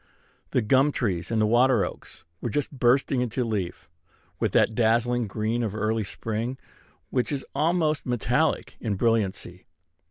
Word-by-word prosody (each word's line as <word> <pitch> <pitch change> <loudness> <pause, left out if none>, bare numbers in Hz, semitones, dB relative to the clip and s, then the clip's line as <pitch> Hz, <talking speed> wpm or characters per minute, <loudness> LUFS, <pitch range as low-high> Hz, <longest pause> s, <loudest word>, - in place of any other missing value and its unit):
The 125 - +1
gum 135 +7 +4
trees 95 -11 -2
and 110 -2 +2
water 120 0 +4
oaks - - -10 0.2
were 120 - -2
just 145 +5 -2
bursting 130 0 +2
into 125 +1 -1
leaf 95 -7 -3 0.5
with - - 0
that - - +4
dazzling 120 +1 +2
green 110 +4 -1
of 110 -3 -2
early 110 +1 0
spring 115 +5 -4 0.5
which 125 +2 0
is 140 -2 -3
almost 155 +1 +1
metallic 125 -2 0
in 105 -3 -1
brilliancy. 100 -4 -1
115 Hz, 145 wpm, -26 LUFS, 110-130 Hz, 0.5 s, gum